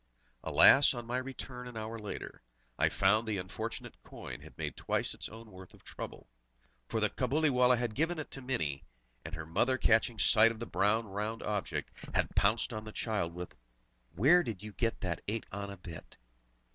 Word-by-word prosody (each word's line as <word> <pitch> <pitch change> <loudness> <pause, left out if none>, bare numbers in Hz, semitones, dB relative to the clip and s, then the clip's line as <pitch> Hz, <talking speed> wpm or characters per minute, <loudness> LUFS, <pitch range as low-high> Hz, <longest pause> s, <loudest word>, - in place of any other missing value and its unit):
Alas, 135 -1 +7
on 120 -1 -5
my 120 +2 -1
return 130 -1 -6
an 120 -2 -8
hour 110 +1 -5
later, 105 -1 -7 0.4
I - - +4
found 110 +4 +3
the 105 -2 0
unfortunate 90 0 -5
coin - - -8
had - - -14
made - - -3
twice - - -1
its - - -7
own 115 0 -11
worth 95 -1 -12
of - - -21
trouble! - - -8 0.6
For - - -1
the - - +1
Cabuliwallah 125 -4 +3
had 120 -2 -2
given 165 +7 0
it 155 - -6
to 135 - -5
Mini, 80 - -2 0.4
and - - -6
her 80 -1 -6
mother 125 +11 +2
catching 115 -1 +3
sight 110 +2 +6
of 115 - -8
the 120 - -4
bright 110 0 +2
round 105 +1 -4
object, 105 -2 -2 0.2
had - - +1
pounced 110 +4 +2
on 110 -1 -4
the 110 - -8
child 100 -7 -2
with: 90 0 -6 0.6
"Where 150 - +6
did 110 - -5
you 105 - -7
get 115 +2 -1
that 90 -3 -2
eight 110 +2 -2
anna 100 0 -5
bit?" 85 -3 -10
110 Hz, 185 wpm, -32 LUFS, 100-125 Hz, 0.6 s, Alas